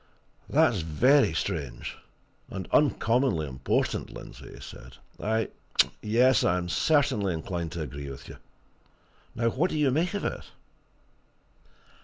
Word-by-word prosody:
"That's 115 -5 +3
very 120 - +4
strange, 80 -6 -3 0.5
and 95 -2 -6
uncommonly 120 - +2
important, 65 -1 -1
Lindsey!" - - -11
he - - -12
said. - - -11 0.2
"I 110 +1 0 0.5
yes, 120 +3 +4
I 90 -1 +3
am 90 -1 -3
certainly 105 - +2
inclined 85 0 -4
to 85 -2 -3
agree 70 0 -7
with 70 - -9
you. - - -10 1.0
Now, 115 0 +1
what 160 +10 +1
do - - -2
you 145 -3 +3
make 170 +8 0
of 205 - -2
it?" - - -3
105 Hz, 130 wpm, -27 LUFS, 80-130 Hz, 1.0 s, very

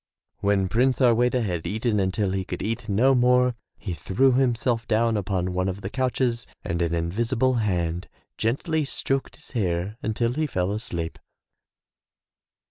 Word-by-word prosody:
When 100 -1 +2
Prince 125 +6 +2
Harweda 125 0 +3
had 90 -6 -2
eaten 110 0 0
until 95 +1 0
he 95 0 -1
could - - -5
eat 115 +1 -3
no 120 +7 +4
more 125 0 +4 0.2
he 95 -4 -5
threw 115 +10 +2
himself 120 -2 +1
down 115 +1 +2
upon 95 -3 -1
one 90 +1 0
of 95 +2 -5
the 95 - -5
couches 125 -2 0 0.2
and 85 +1 -2
an 85 0 +1
invisible 115 +10 +1
hand 90 -4 -1 0.3
gently 155 +8 0
stroked 135 -1 -2
his - - -9
hair 95 -2 -1
until 115 +2 0
he 155 +3 0
fell 90 -7 -1
asleep. 85 -6 -4
110 Hz, 150 wpm, -25 LUFS, 95-125 Hz, 0.3 s, no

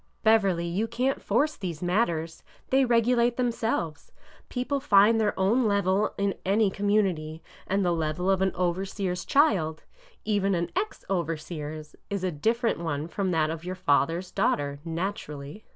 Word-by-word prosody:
'' - - -42
Beverly, 200 -6 +3
you 185 +6 -1
can't 250 +4 -1
force 280 +9 +1
these 175 -4 -5
matters. 170 -4 0 0.3
They 265 0 +4
regu 240 0 +3
late 235 0 +2
themselves. 225 -10 -2 0.4
People 265 +3 -1
find 225 -3 +5
their 210 -2 0
own 220 +6 +3
level 200 0 +1
in 200 -1 0
any 200 +1 +2
com 205 +1 -3
munity, 170 -7 0 0.3
and 195 0 +1
the 175 - +2
level 160 +2 -2
of 195 -1 +2
an 190 0 +2
overseer's 180 +1 -2
child 185 - +2 0.2
— - - -31
even 195 -1 +1
an 170 0 -2
ex 405 +4 -3
overseer's 155 -3 -4
— - - -44
is 200 -2 -3
a 185 - 0
different 225 - 0
one 155 -2 -3
from 190 +2 -2
that 160 -3 +1
of 165 0 -6
your 180 +1 -4
father's 170 +1 +1
daughter, 140 0 0
naturally. 165 -1 -5
190 Hz, 170 wpm, -27 LUFS, 165-220 Hz, 0.4 s, find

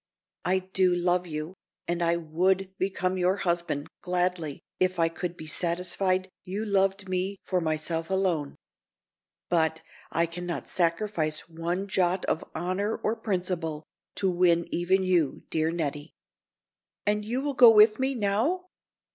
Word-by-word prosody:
I 185 +2 +2
do 185 -1 +2
love 175 0 +1
you, 155 +2 -5 0.3
and 175 0 -1
I 170 0 +3
would 185 +4 0
become 185 -1 -1
your 180 +1 +3
husband, 170 -6 -1
gladly, 180 -4 -1 0.2
if 185 0 +1
I 165 -1 +3
could 175 +1 -5
be 155 - -8
satisfied 180 +3 0 0.2
you 200 +4 -3
loved 195 -1 +1
me 185 +2 -2
for 185 -2 0
myself 160 +1 -1
alone. 180 -7 0 0.9
But, 160 -2 +1 0.3
I 170 - +2
can 175 +1 -6
not 170 - -3
sacrifice 165 -3 0
one 170 +4 -3
jot 185 -1 +1
of 160 - 0
honor 185 +6 -1
or 220 - -1
principle 180 -8 -2 0.3
to 195 - 0
win 175 -2 +3
even 185 +2 +2
you, 175 -6 +1
dear 160 0 +1
Nettie." 150 -2 -3 0.9
"And 210 0 +1
you 235 +5 -2
will 290 -1 -1
go 245 -3 +9
with 215 0 +6
me, 265 +1 0
now?" 230 - +1
180 Hz, 145 wpm, -27 LUFS, 170-190 Hz, 0.9 s, go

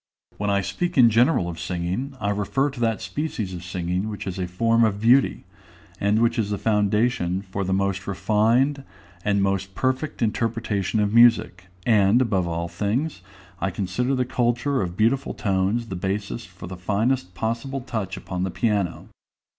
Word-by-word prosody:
When 105 0 0
I 100 0 +2
speak 175 - -3
in 120 -3 +7
general 120 - +3
of 85 -1 -6
singing, 90 +10 -3
I 100 - 0
refer 135 +8 0
to 135 - -10
that 115 -4 0
species 105 -2 -3
of 90 -1 -7
singing 90 +2 -2
which 105 - -6
is 95 -1 -4
a 90 - -1
form 115 +6 +2
of 105 -3 +1
beauty, 115 - +3 0.6
and 105 +3 +2
which 115 +1 +1
is 105 -2 0
the 100 - -1
foundation 105 -3 +1
for 95 0 -4
the 95 - -2
most 95 0 0
refined 115 +8 +2 0.4
and 100 -1 +2
most 95 -1 -1
perfect 130 +1 -1
interpretation 110 -2 -1
of 105 0 0
music; 115 -6 +4 0.2
and, 105 0 +4
above 95 -8 +1
all 85 0 -2
things, 110 - -2 0.4
I 95 - 0
consider 100 +8 -1
the 130 -1 0
culture 120 +3 0
of 90 -1 -4
beautiful 120 +5 +1
tones 100 +3 0
the 95 - -4
basis 100 +5 -3
for 90 -1 -11
the 90 +1 -7
finest 100 +1 -1
possible 120 +6 -2
touch 105 -6 -4
upon 90 -1 -5
the 95 - 0
piano. 100 0 -1
105 Hz, 170 wpm, -24 LUFS, 95-120 Hz, 0.6 s, in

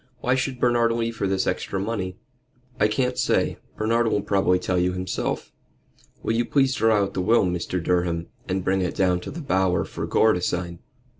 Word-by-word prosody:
"Why 125 +2 +1
should 130 0 -1
Bernard 120 -1 +3
leave 115 0 -2
her 100 - 0
this 95 0 0
extra 95 - -2
money?" 95 -3 -3 0.6
"I 105 - +5
can't 125 +3 -1
say. - - +1 0.2
Bernard 115 +2 +1
will 105 -2 0
probably 95 -3 +2
tell 90 0 -1
you 90 +1 +1
himself. 90 0 -3 0.7
Will 110 - 0
you 115 +1 +2
please 135 +1 +2
draw 110 -4 +3
out 100 0 -4
the 95 - -1
will, 110 +3 +4
Mr. 90 0 -2
Durham, 85 -1 0 0.2
and 95 0 -1
bring 95 +1 +1
it 90 - -2
down 90 -2 +2
to - - -8
the 165 +3 -6
Bower 95 - +1
for - - -5
Gore 110 - +4
to 90 - -2
sign?" 85 -1 -2
95 Hz, 200 wpm, -24 LUFS, 90-115 Hz, 0.7 s, I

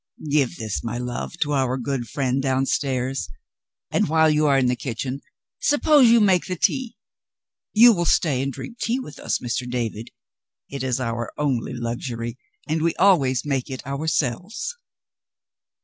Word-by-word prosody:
"Give 140 -4 +2
that, 110 -3 -3
my 120 0 -4
love, 125 +6 -5
to 150 -1 +1
our 130 -2 +1
good 125 -1 -3
friend 135 0 -1
downstairs 135 - -1 0.6
and, - - +1
while 160 0 +4
you 150 0 +2
are 140 -1 +4
in 130 - +3
the 125 0 +2
kitchen, 130 +2 -4 0.4
suppose 290 -3 +5
you 235 0 +6
make 190 -5 +3
the 185 - -2
tea. 250 +7 0 0.8
You 235 +2 +8
will 175 -3 -1
stay 145 -5 +2
and 140 +1 -1
drink 235 - -9
tea 240 +3 0
with 150 - -9
us, - - -1
Mr. 125 0 -3
David? 115 -2 -3 0.6
It 140 -1 -4
is 130 -1 -1
our 120 -1 -3
only 135 -5 -1
luxury, 120 0 -4 0.3
and 155 +1 0
we 165 +1 +1
always 140 -11 +3
make 135 -2 -1
it 130 -1 -6
ourselves." 160 - -2
135 Hz, 160 wpm, -23 LUFS, 125-160 Hz, 0.8 s, You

